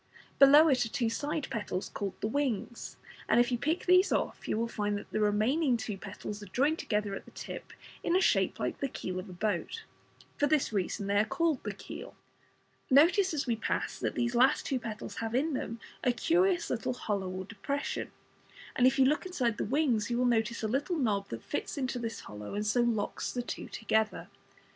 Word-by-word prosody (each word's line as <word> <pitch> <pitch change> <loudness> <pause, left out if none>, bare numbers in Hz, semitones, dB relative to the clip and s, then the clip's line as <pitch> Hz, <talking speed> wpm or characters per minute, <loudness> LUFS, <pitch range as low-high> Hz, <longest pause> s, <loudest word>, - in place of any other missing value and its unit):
Below 290 +3 +9
it 260 -5 +3
are 225 - -4
two 230 0 0
side 295 +5 -2
petals 205 -4 -3
called 200 -2 -4
the 215 - 0
"wings," 240 -3 -2 0.3
and - - +5
if 240 +1 +3
you 245 - +1
pick 310 +7 -1
these 365 +2 +5
off - - -1
you - - 0
will 230 +1 0
find 205 -2 -1
that - - -10
the 215 - -1
remaining 235 +7 +2
two 220 -2 -4
petals 205 +1 -7
are 205 - -9
joined 280 - +1
together 210 -2 -1
at - - -6
the - - -13
tip - - -8 0.3
in 340 - +1
a - - +5
shape - - +2
like - - -2
the 275 - 0
keel 185 -7 -4
of 185 +2 -8
a - - -8
boat. 205 - -2 0.5
For 290 - +3
this 290 -6 +1
reason 200 0 -1
they 200 +1 +1
are - - +5
called 320 +5 0
the 210 - -3
"keel". 195 - -9 0.7
Notice 345 +8 +5
as 305 -3 -1
we 235 -3 +1
pass 225 - -2
that - - -2
these 240 0 +1
two 240 - -1
last 265 +2 +3
petals 220 -2 -6
have 225 +1 -2
in 300 +4 +1
them 230 -3 -3 0.2
a 250 - +4
curious 350 +8 +2
little 245 +1 -1
hollow 200 -6 -2
or 185 +1 -5
depression, 280 +8 -3 0.7
and 250 - +5
if 260 - +2
you 265 - +6
look 300 +6 +1
inside 250 -12 -1
the - - 0
"wings" 245 -5 +1
you 240 - 0
will 250 - +2
notice 230 -1 +1
a - - +1
little 285 - -1
knob 210 -8 0
that 115 0 -6
fits 290 - -4
into 260 -2 -2
this 230 -1 -4
hollow, 105 - -8
and 210 +1 -1
so 225 +4 +2
locks 230 -4 -1
the 245 - -3
two - - -5
together. 220 -1 0
235 Hz, 215 wpm, -31 LUFS, 210-280 Hz, 0.7 s, Below